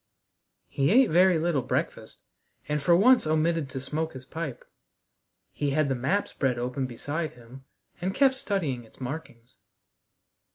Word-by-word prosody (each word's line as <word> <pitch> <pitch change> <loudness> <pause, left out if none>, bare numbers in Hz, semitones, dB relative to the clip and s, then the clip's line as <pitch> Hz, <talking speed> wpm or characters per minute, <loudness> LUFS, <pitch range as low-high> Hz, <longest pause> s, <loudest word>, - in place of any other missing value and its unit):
He 140 +1 0
ate 250 +2 +5
very 180 +1 +5
little 160 -3 +1
breakfast, - - -3 0.5
and 150 0 -1
for 170 +4 +4
once 240 +1 +5
omitted 155 -1 +1
to 135 - -5
smoke 155 +5 -3
his 130 -1 -10
pipe. 150 -3 -6 0.9
He 145 - -2
had 145 +1 +1
the - - +2
map 135 +12 0
spread 130 -3 -1
open 125 +2 -2
beside 145 +6 -4
him, 125 +3 -14 0.4
and 185 +2 -2
kept 270 -1 +4
studying 180 - -2
its 110 - -20
markings. 125 -3 -7
150 Hz, 150 wpm, -27 LUFS, 130-170 Hz, 0.9 s, ate